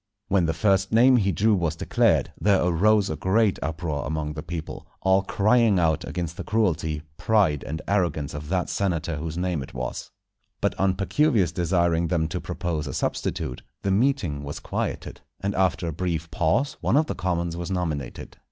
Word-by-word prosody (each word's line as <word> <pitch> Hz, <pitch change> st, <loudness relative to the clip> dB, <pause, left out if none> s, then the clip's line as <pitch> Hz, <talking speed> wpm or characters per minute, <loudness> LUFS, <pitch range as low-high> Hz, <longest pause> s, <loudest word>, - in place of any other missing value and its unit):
When 95 Hz, -3 st, +3 dB
the 80 Hz, -, +1 dB
first 95 Hz, 0 st, +2 dB
name 125 Hz, +3 st, +6 dB
he 100 Hz, -4 st, +2 dB
drew 105 Hz, +6 st, +2 dB
was 85 Hz, -5 st, 0 dB
declared, -, -, +2 dB
there 100 Hz, -2 st, +4 dB
arose 100 Hz, +4 st, +3 dB
a -, -, -2 dB
great 100 Hz, +4 st, +2 dB
uproar 80 Hz, -2 st, -3 dB
among 80 Hz, -1 st, -2 dB
the 75 Hz, -, -5 dB
people, 80 Hz, 0 st, -6 dB
all 95 Hz, 0 st, +4 dB
crying 110 Hz, +2 st, +3 dB
out 80 Hz, -3 st, +2 dB
against 85 Hz, -2 st, -4 dB
the -, -, -4 dB
cruelty, 80 Hz, -8 st, 0 dB
pride, 95 Hz, -, +2 dB
and 80 Hz, +2 st, -5 dB
arrogance 85 Hz, -7 st, 0 dB
of 75 Hz, +1 st, -7 dB
that 90 Hz, -1 st, 0 dB
senator 85 Hz, -5 st, -1 dB
whose 80 Hz, +1 st, -5 dB
name 90 Hz, -4 st, -1 dB
it 65 Hz, -, -9 dB
was. 65 Hz, 0 st, -4 dB, 0.5 s
But -, -, +1 dB
on 95 Hz, -1 st, +2 dB
Pacuvius 105 Hz, -, +2 dB
desiring 85 Hz, -1 st, +1 dB
them 80 Hz, -1 st, 0 dB
to -, -, -3 dB
propose 85 Hz, -5 st, -3 dB
a 70 Hz, -, -5 dB
substitute, -, -, -2 dB, 0.2 s
the 100 Hz, -, +1 dB
meeting 100 Hz, -, +1 dB
was 70 Hz, 0 st, -6 dB
quieted, -, -, -4 dB, 0.2 s
and 100 Hz, +1 st, -2 dB
after 95 Hz, -2 st, +1 dB
a -, -, -4 dB
brief 85 Hz, -1 st, -3 dB
pause 105 Hz, -, +1 dB
one -, -, +2 dB
of 155 Hz, -, +4 dB
the -, -, -3 dB
commons 85 Hz, -2 st, -2 dB
was 85 Hz, +1 st, -5 dB
nominated. 80 Hz, -8 st, -4 dB
90 Hz, 180 wpm, -25 LUFS, 80-100 Hz, 0.5 s, name